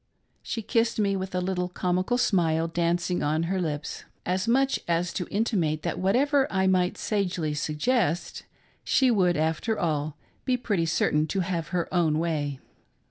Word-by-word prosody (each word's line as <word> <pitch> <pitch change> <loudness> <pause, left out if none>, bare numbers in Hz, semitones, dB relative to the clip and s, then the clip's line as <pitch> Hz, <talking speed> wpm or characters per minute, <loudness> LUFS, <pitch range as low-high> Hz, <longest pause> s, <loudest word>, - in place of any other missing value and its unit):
She 225 - -4
kissed 230 +1 +1
me, 200 -2 +2
with 190 -1 -4
a 180 - +1 0.3
comical 185 +6 0
little - - +1
smile 165 -8 +2
dancing 175 +2 0
on 155 +2 +1
her 185 +2 -1
lips, 150 -3 -4 0.2
as 185 +2 -1
much 270 +3 +2
as 170 0 0
to 180 - -3
intimate 180 -8 0
that - - -2
whatever 270 +9 +2
I 190 -1 +1
might 185 -1 +2
sagely 180 -7 -1
suggest, 160 - 0 0.4
she 260 -2 +3
would, 180 -6 +3
after 160 +8 0
all, 155 -3 -1 0.3
be 255 -1 +1
pretty 200 -9 0
certain 155 -1 +1
to 190 +5 -1
have 170 -3 -2
her 175 -1 -1
own 165 -4 +2
way. 150 -4 -1
180 Hz, 160 wpm, -26 LUFS, 160-205 Hz, 0.4 s, she